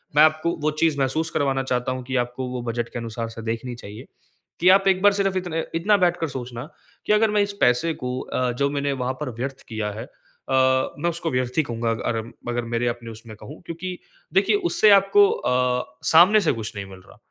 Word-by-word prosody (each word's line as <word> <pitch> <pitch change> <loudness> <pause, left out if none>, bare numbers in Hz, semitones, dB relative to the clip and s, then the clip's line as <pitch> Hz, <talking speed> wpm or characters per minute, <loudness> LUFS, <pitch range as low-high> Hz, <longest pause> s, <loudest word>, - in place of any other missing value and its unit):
मैं 150 - +7
आपको 155 +2 +2
वो 155 0 +1
चीज़ 160 -3 +2
महसूस 155 +5 0
करवाना 135 -3 0
चाहता 125 -1 -1
हूँ 130 0 -4
कि 135 +1 -4
आपको 125 +1 -6
वो 125 -1 -4
बजट 120 0 -3
के 120 - -6
अनुसार 115 0 -5
से 115 0 -9
देखनी 115 +2 -4
चाहिए। 105 -2 -10 0.5
कि 180 +2 +5
आप 195 0 -5
एक 185 -1 +3
बार 205 0 +5
सिर्फ़ 195 -1 0
इत 180 -1 -3 0.3
इतना 200 +5 +3
बैठ 175 0 +1
कर 165 - -1
सोचना 125 +1 -7 0.4
कि - - +3
अगर 210 0 +3
मैं 210 - +3
इस 200 0 -1
पैसे 125 +7 +3
को 125 -1 -4
अ, 125 -1 -1
जो 140 +4 0
मैंने 140 0 -1
वहाँ 130 +1 -1
पर 150 - -2
व्यर्थ 135 +1 -4
किया 110 -2 -3
है 110 +2 -7
अ, 140 - -22 0.9
मैं 170 - 0
उसको 170 -1 -3
व्यर्थ 125 +2 -2
ही 155 - +4
कहूँगा 115 -3 -3
अग 115 0 -3 0.2
अगर 120 0 -1
मेरे 120 +1 0
अपने 120 -1 -4
उसमें 110 0 -11
कहूँ 150 +7 -11
क्योंकि 180 +2 -6 0.4
देखिए - - +3 0.2
उससे 280 -11 +5
आपको 405 - +4
अ, 125 - -1 0.2
सामने 185 +6 +7
से 165 - +2
कुछ 105 - -6
नहीं 100 -1 -5
मिल 95 -1 -12
रहा। - - -17
130 Hz, 220 wpm, -23 LUFS, 120-170 Hz, 0.9 s, मैं